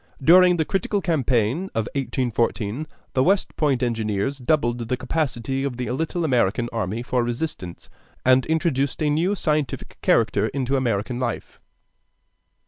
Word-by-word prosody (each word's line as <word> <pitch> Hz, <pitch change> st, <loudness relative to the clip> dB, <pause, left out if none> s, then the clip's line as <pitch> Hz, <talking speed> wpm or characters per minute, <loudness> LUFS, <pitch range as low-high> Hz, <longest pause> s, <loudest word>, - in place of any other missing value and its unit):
During 180 Hz, +3 st, +6 dB
the 160 Hz, -, +1 dB
critical 195 Hz, +3 st, -1 dB
campaign 140 Hz, -, +1 dB
of 110 Hz, -1 st, 0 dB
1814, 120 Hz, 0 st, -1 dB, 0.3 s
the 130 Hz, -1 st, +3 dB
West 195 Hz, +4 st, +1 dB
Point 140 Hz, -5 st, +1 dB
engineers 115 Hz, +2 st, -1 dB
doubled 120 Hz, -3 st, +1 dB
the 125 Hz, -, -1 dB
capacity 135 Hz, -2 st, -2 dB
of 135 Hz, -3 st, -3 dB
the 125 Hz, -2 st, -3 dB
little 160 Hz, +5 st, -1 dB
American 120 Hz, -3 st, +1 dB
army 115 Hz, +1 st, -2 dB
for 125 Hz, 0 st, 0 dB
resistance, 120 Hz, -, -5 dB, 0.4 s
and 130 Hz, 0 st, +5 dB
introduced 155 Hz, -3 st, 0 dB
a 150 Hz, -, +2 dB
new 165 Hz, +5 st, +1 dB
and 205 Hz, -, -1 dB
scientific 150 Hz, -5 st, -2 dB
character -, -, +2 dB
into 135 Hz, 0 st, -1 dB
American 120 Hz, -2 st, -1 dB
life. 120 Hz, -2 st, -4 dB
130 Hz, 140 wpm, -23 LUFS, 120-155 Hz, 0.4 s, During